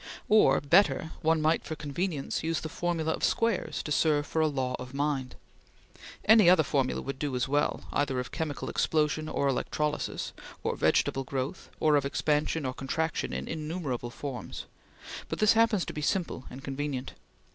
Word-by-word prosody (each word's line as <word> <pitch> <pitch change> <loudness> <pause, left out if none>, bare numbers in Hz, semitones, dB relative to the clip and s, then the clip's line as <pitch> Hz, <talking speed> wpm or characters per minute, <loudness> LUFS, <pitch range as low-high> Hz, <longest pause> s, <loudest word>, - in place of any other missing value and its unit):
Or 215 0 +6
better, 160 +1 +3
one 160 -1 +2
might, 160 +2 +2
for 155 - -5
convenience, 150 0 -3
use 165 0 -1
the 160 - -5
formula 165 -1 -1
of - - -6
squares 230 -3 0
to 150 - -5
serve 150 -1 +2
for 160 - -1
a 155 - +4
law 130 -3 -1
of 125 +1 -8
mind. 140 -3 -1 0.9
Any 215 -4 +7
other 180 -3 +6
formula 135 -3 0
would 135 -1 -5
do 145 -3 -2
as 125 - 0
well, 145 +2 0
either 135 -3 +1
of 125 - -5
chemical 155 -4 -3
explosion, 155 0 0
or 140 - 0
electrolysis, 150 +3 -2 0.3
or - - 0
vegetable 135 - +2
growth, 135 +5 -4
or 155 -2 +4
of 140 - +1
expansion 150 +1 0
or 130 - -2
contraction 160 +5 -2
in - - -4
innumerable 155 -6 -3
forms; 125 -2 -6 0.6
but - - -2
this 215 +1 +5
happens 225 -4 +3
to - - -6
be 150 - -4
simple 165 -5 -1
and 130 +2 -10
convenient. 135 -1 -4
150 Hz, 170 wpm, -29 LUFS, 135-160 Hz, 0.9 s, Any